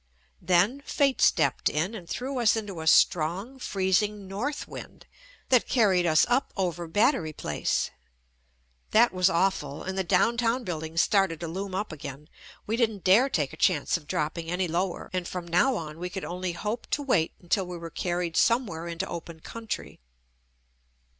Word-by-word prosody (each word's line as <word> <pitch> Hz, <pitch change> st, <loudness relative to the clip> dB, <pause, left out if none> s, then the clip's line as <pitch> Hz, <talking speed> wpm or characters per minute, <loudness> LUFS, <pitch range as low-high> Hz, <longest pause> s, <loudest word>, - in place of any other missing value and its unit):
Then 185 Hz, +10 st, +2 dB
fate 280 Hz, -4 st, +1 dB
stepped -, -, +3 dB
in 165 Hz, +8 st, -1 dB
and 180 Hz, -6 st, -9 dB
threw 260 Hz, +1 st, -3 dB
us 230 Hz, -2 st, +4 dB
into 205 Hz, -7 st, -4 dB
a 160 Hz, -, -5 dB
strong 180 Hz, +11 st, +3 dB
freezing 200 Hz, -1 st, 0 dB
north 250 Hz, +10 st, -3 dB
wind -, -, -10 dB, 0.4 s
that 255 Hz, -3 st, +4 dB
carried 190 Hz, -8 st, +3 dB
us 155 Hz, -1 st, +5 dB
up 245 Hz, +3 st, +1 dB
over 175 Hz, -3 st, -2 dB
Battery 205 Hz, -, +2 dB
Place. 75 Hz, -, -1 dB, 1.0 s
That 230 Hz, 0 st, +4 dB
was 185 Hz, 0 st, +3 dB
awful, 170 Hz, -5 st, 0 dB
and 190 Hz, 0 st, -4 dB
the 190 Hz, -, 0 dB
down 195 Hz, +6 st, +2 dB
town 235 Hz, +1 st, +1 dB
buildings 160 Hz, -3 st, -1 dB
started 195 Hz, -6 st, +2 dB
to 170 Hz, -, -3 dB
loom 190 Hz, +3 st, -4 dB
up 205 Hz, 0 st, -2 dB
again. 150 Hz, 0 st, -8 dB, 0.4 s
We 220 Hz, +2 st, -1 dB
JUST 235 Hz, -2 st, +4 dB
ME -, -, -8 dB
didn't 195 Hz, -, -13 dB
dare 220 Hz, +9 st, +5 dB
take 155 Hz, -, -1 dB
a -, -, -10 dB
chance 160 Hz, -5 st, +2 dB
of 160 Hz, -4 st, -5 dB
dropping 160 Hz, +3 st, -2 dB
any 180 Hz, +1 st, 0 dB
low 175 Hz, +3 st, 0 dB
er -, -, -11 dB
and 180 Hz, -2 st, -2 dB
from 180 Hz, -2 st, -5 dB
now 180 Hz, +10 st, +3 dB
on 155 Hz, -4 st, -6 dB
we 180 Hz, +1 st, -4 dB
could 190 Hz, +1 st, -5 dB
only 180 Hz, 0 st, -3 dB
hope 210 Hz, +6 st, -4 dB
to 290 Hz, -, -1 dB
wait 185 Hz, -, +1 dB
until 185 Hz, +1 st, 0 dB
we 180 Hz, -1 st, -6 dB
were 165 Hz, -1 st, -8 dB
carried 175 Hz, -1 st, -2 dB
somewhere 220 Hz, -9 st, +1 dB
into 170 Hz, +2 st, -3 dB
open 170 Hz, -1 st, -7 dB
country. 230 Hz, +4 st, -6 dB
185 Hz, 180 wpm, -27 LUFS, 170-220 Hz, 1.0 s, us